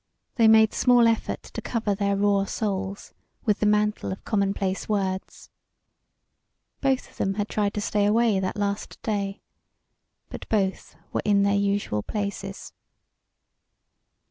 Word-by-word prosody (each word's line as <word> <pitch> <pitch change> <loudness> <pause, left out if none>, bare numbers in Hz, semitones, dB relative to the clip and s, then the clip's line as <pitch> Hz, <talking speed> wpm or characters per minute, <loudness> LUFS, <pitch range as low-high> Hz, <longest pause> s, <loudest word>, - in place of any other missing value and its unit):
They 230 -3 +4
made 220 0 +6
small 245 -2 +5
effort 225 -1 -1
to - - -7
cover 220 -3 -1
their 200 0 0
raw 200 0 +2
souls 195 -1 -3 0.3
with 210 -3 +2
the 210 - +2
mantle 210 -1 +1
of 190 - -7
commonplace 195 -2 -1
words. 190 -2 -3 1.3
Both 270 -2 0
of - - -22
them 195 0 0
had 205 0 -1
tried 205 -1 -1
to 210 - -1
stay 205 0 +1
away 220 -1 +3
that 185 +1 -3
last 205 0 -3
day. 200 -2 -2 0.9
But - - -9
both 195 -3 -1 0.2
were - - 0
in 200 -1 +3
their 200 0 +2
usual 200 - 0
places. 200 - -5
205 Hz, 140 wpm, -25 LUFS, 195-215 Hz, 1.3 s, made